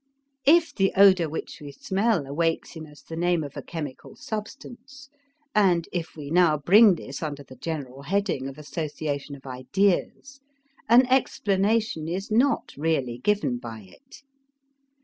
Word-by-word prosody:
If 330 Hz, +2 st, +5 dB
the 195 Hz, -1 st, +1 dB
odor 190 Hz, -5 st, +6 dB
which 160 Hz, -, -6 dB
we 145 Hz, -1 st, -8 dB
smell 190 Hz, +3 st, 0 dB
awakes 165 Hz, +5 st, -2 dB
in 160 Hz, -1 st, -8 dB
us 150 Hz, 0 st, -17 dB
the 165 Hz, -, -8 dB
name 175 Hz, -1 st, +1 dB
of 145 Hz, -2 st, -8 dB
a -, -, -5 dB
chemical 150 Hz, -6 st, -7 dB
substance, 245 Hz, +5 st, -8 dB, 0.4 s
and 180 Hz, -5 st, +3 dB
if 170 Hz, -2 st, -4 dB
we 145 Hz, -2 st, -8 dB
now 170 Hz, -3 st, +4 dB
bring 195 Hz, +7 st, +6 dB
this 140 Hz, -4 st, -8 dB
under 145 Hz, -3 st, -5 dB
the 130 Hz, -1 st, -14 dB
general 140 Hz, -2 st, -6 dB
heading 180 Hz, -4 st, -1 dB
of 135 Hz, +1 st, -9 dB
association 150 Hz, -2 st, -5 dB
of 140 Hz, -, -16 dB
ideas, 190 Hz, -, -1 dB, 0.5 s
an 245 Hz, +3 st, +7 dB
explanation 215 Hz, -7 st, +1 dB
is 190 Hz, +5 st, -4 dB
not 255 Hz, +6 st, +1 dB
really 140 Hz, -6 st, -1 dB
given 200 Hz, -8 st, 0 dB
by 115 Hz, -2 st, -8 dB
it. 270 Hz, -, -17 dB
165 Hz, 150 wpm, -25 LUFS, 145-205 Hz, 0.5 s, an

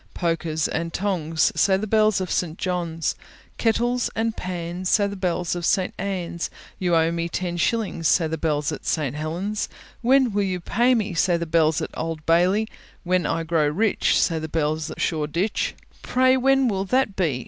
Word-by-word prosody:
Pokers 165 Hz, -2 st, -1 dB
and 165 Hz, +1 st, -3 dB
tongs, 165 Hz, -5 st, 0 dB
Say 195 Hz, -2 st, +3 dB
the 205 Hz, -, -3 dB
bells 215 Hz, -1 st, +3 dB
of 185 Hz, -1 st, -3 dB
St. 170 Hz, -2 st, -1 dB
John's. 170 Hz, -3 st, -2 dB, 0.5 s
Kettles 240 Hz, +2 st, +1 dB
and 225 Hz, 0 st, -1 dB
pans, 180 Hz, 0 st, -4 dB
Say 205 Hz, -, +4 dB
the 200 Hz, 0 st, -3 dB
bells 180 Hz, -2 st, -1 dB
of 175 Hz, -, -4 dB
St. 185 Hz, +2 st, +1 dB
Ann's. 180 Hz, -3 st, -3 dB, 0.3 s
You 175 Hz, -2 st, +1 dB
owe 165 Hz, 0 st, +3 dB
me 170 Hz, 0 st, -2 dB
ten 175 Hz, 0 st, -3 dB
shillings, 190 Hz, -3 st, 0 dB
Say 170 Hz, -, +3 dB
the 160 Hz, 0 st, -2 dB
bells 150 Hz, -2 st, -1 dB
at -, -, -6 dB
St. 145 Hz, -4 st, -1 dB
Helen's. 175 Hz, +8 st, -3 dB, 0.3 s
When 255 Hz, 0 st, +4 dB
will 205 Hz, -, +1 dB
you 185 Hz, -2 st, -1 dB
pay 240 Hz, +8 st, +2 dB
me? 210 Hz, -4 st, -1 dB
Say 175 Hz, +1 st, +2 dB
the 170 Hz, -, -3 dB
bells 160 Hz, -1 st, +2 dB
at -, -, -5 dB
Old 160 Hz, -1 st, -4 dB
Bailey. 180 Hz, +6 st, +3 dB, 0.4 s
When 180 Hz, -3 st, +1 dB
I 165 Hz, -, -1 dB
grow 160 Hz, -2 st, +1 dB
rich, 200 Hz, +8 st, +2 dB
Say 165 Hz, -2 st, +1 dB
the 160 Hz, -, -4 dB
bells 155 Hz, 0 st, -1 dB
at -, -, -8 dB
Shoreditch. 165 Hz, +6 st, -1 dB, 0.3 s
Pray 255 Hz, +1 st, +3 dB
when 270 Hz, 0 st, +3 dB
will 195 Hz, -3 st, -1 dB
that 250 Hz, -1 st, +1 dB
be? 155 Hz, -9 st, 0 dB
175 Hz, 185 wpm, -23 LUFS, 165-205 Hz, 0.5 s, Say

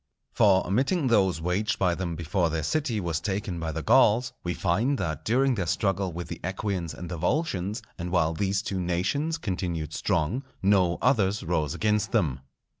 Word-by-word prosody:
For, 95 Hz, -2 st, +4 dB
omitting 135 Hz, -, +1 dB
those 95 Hz, -7 st, +3 dB
waged 90 Hz, +6 st, 0 dB
by 90 Hz, -2 st, +2 dB
them 85 Hz, -1 st, -3 dB
before 85 Hz, +2 st, 0 dB
their 80 Hz, -1 st, -2 dB
city 125 Hz, -, 0 dB
was 85 Hz, -4 st, -1 dB
taken 95 Hz, -2 st, -3 dB
by 80 Hz, -1 st, -3 dB
the -, -, -4 dB
Gauls, 120 Hz, +4 st, +4 dB
we 90 Hz, -1 st, -2 dB
find 115 Hz, -, +1 dB
that 80 Hz, -, -3 dB
during 130 Hz, +6 st, +2 dB
their 95 Hz, -7 st, -2 dB
struggle 95 Hz, +3 st, 0 dB
with 85 Hz, +1 st, -6 dB
the -, -, -6 dB
Equians 95 Hz, -2 st, -3 dB
and 90 Hz, -, -7 dB
the 85 Hz, 0 st, -5 dB
Volscians, 100 Hz, -, -1 dB, 0.2 s
and 85 Hz, +1 st, -3 dB
while 85 Hz, -3 st, +2 dB
these 100 Hz, +3 st, 0 dB
two 95 Hz, -5 st, -3 dB
nations 95 Hz, -, 0 dB
continued 90 Hz, -, -3 dB
strong, 85 Hz, -, 0 dB, 0.2 s
no 95 Hz, -3 st, +3 dB
others 105 Hz, -5 st, +2 dB
rose 80 Hz, -4 st, -1 dB
against 105 Hz, -1 st, 0 dB
them. 80 Hz, -, +1 dB
95 Hz, 180 wpm, -27 LUFS, 85-105 Hz, 0.2 s, For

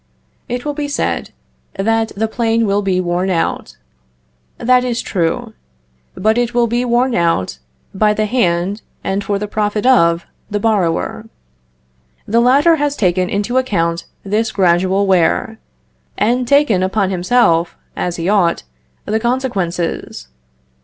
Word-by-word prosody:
It 245 Hz, +2 st, -3 dB
will 295 Hz, -, -1 dB
be 290 Hz, 0 st, -3 dB
said, 285 Hz, -, -2 dB, 0.5 s
that 225 Hz, +3 st, 0 dB
the 220 Hz, +2 st, 0 dB
plane 230 Hz, 0 st, 0 dB
will 200 Hz, 0 st, +1 dB
be 190 Hz, -2 st, 0 dB
worn 180 Hz, +1 st, -1 dB
out. 165 Hz, -, -2 dB, 0.8 s
That 250 Hz, +1 st, +3 dB
is 245 Hz, -1 st, -1 dB
true; 170 Hz, -4 st, -2 dB, 0.6 s
but 220 Hz, +4 st, +1 dB
it 240 Hz, 0 st, -1 dB
will 240 Hz, -1 st, +4 dB
be 240 Hz, +2 st, 0 dB
worn 245 Hz, +1 st, +1 dB
out 165 Hz, -, 0 dB, 0.3 s
by 210 Hz, +2 st, +2 dB
the 215 Hz, -, 0 dB
hand 200 Hz, -3 st, 0 dB, 0.2 s
and 195 Hz, +1 st, -1 dB
for 200 Hz, 0 st, -1 dB
the 210 Hz, +1 st, -4 dB
profit 210 Hz, +1 st, -1 dB
of 170 Hz, -10 st, +4 dB, 0.2 s
the 205 Hz, -, -1 dB
borrower. 205 Hz, 0 st, 0 dB, 1.0 s
The 230 Hz, +3 st, +2 dB
latter 285 Hz, +7 st, +4 dB
has 290 Hz, -1 st, 0 dB
taken 180 Hz, -4 st, +1 dB
into 210 Hz, +6 st, 0 dB
account 170 Hz, -9 st, -1 dB, 0.2 s
this 215 Hz, +3 st, -1 dB
gradual 190 Hz, +1 st, +2 dB
wear, 195 Hz, +4 st, +1 dB, 0.6 s
and 245 Hz, +2 st, +1 dB
taken 280 Hz, -9 st, +3 dB
upon 190 Hz, +1 st, 0 dB
himself, 175 Hz, -3 st, +2 dB, 0.2 s
as 175 Hz, -1 st, -2 dB
he 170 Hz, 0 st, -3 dB
ought, 190 Hz, -, +2 dB, 0.4 s
the 220 Hz, +1 st, 0 dB
consequences. 190 Hz, -, -2 dB
210 Hz, 140 wpm, -17 LUFS, 180-240 Hz, 1.0 s, will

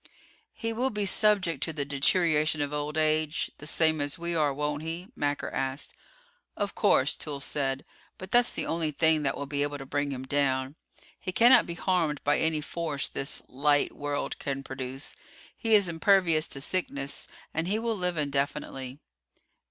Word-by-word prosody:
"He 230 Hz, 0 st, -3 dB
will 250 Hz, +4 st, +1 dB
be 210 Hz, -4 st, -2 dB
subject 195 Hz, -3 st, +3 dB
to 160 Hz, -, -1 dB
the 145 Hz, -2 st, -2 dB
deterioration 155 Hz, +2 st, +2 dB
of 145 Hz, 0 st, -1 dB
old 150 Hz, +1 st, -2 dB
age, 155 Hz, 0 st, +1 dB
the 150 Hz, -, -8 dB
same 160 Hz, -1 st, +2 dB
as 145 Hz, -1 st, -2 dB
we 170 Hz, +1 st, -2 dB
are, 150 Hz, -3 st, +2 dB
won't 150 Hz, +1 st, -2 dB
he?" 165 Hz, +4 st, -5 dB
Macker 145 Hz, 0 st, -1 dB
asked. 135 Hz, +1 st, -3 dB, 0.6 s
"Of 205 Hz, -1 st, -2 dB
course," 145 Hz, -10 st, +3 dB
Toolls 145 Hz, -2 st, -4 dB
said, 135 Hz, -2 st, -1 dB, 0.3 s
"but 185 Hz, 0 st, -9 dB
that's 245 Hz, 0 st, +5 dB
the -, -, -3 dB
only 165 Hz, -1 st, 0 dB
thing 160 Hz, +1 st, +3 dB
that 135 Hz, -2 st, 0 dB
will 140 Hz, -, -4 dB
be 140 Hz, 0 st, -2 dB
able 145 Hz, 0 st, -1 dB
to 135 Hz, -, -8 dB
bring 145 Hz, +1 st, -1 dB
him 130 Hz, -2 st, -4 dB
down. 130 Hz, -1 st, 0 dB, 0.5 s
He 185 Hz, -, -4 dB
cannot 240 Hz, +7 st, +6 dB
be 170 Hz, -, -4 dB
harmed 170 Hz, -6 st, 0 dB
by 145 Hz, -, +3 dB
any 160 Hz, -1 st, +1 dB
force 155 Hz, -2 st, -3 dB
this 135 Hz, +2 st, -3 dB
'light' 145 Hz, +2 st, +2 dB
world 145 Hz, 0 st, -3 dB
can 135 Hz, -1 st, -3 dB
produce; 135 Hz, 0 st, -6 dB, 0.4 s
he 225 Hz, -1 st, +3 dB
is 200 Hz, -3 st, +5 dB
impervious 170 Hz, -2 st, +3 dB
to 135 Hz, -, -4 dB
sickness; 140 Hz, -4 st, -2 dB, 0.3 s
and 160 Hz, +2 st, -1 dB
he 205 Hz, +3 st, +1 dB
will 225 Hz, 0 st, -1 dB
live 180 Hz, -3 st, -1 dB
indefinitely." 140 Hz, -2 st, -2 dB
150 Hz, 175 wpm, -28 LUFS, 140-170 Hz, 0.6 s, cannot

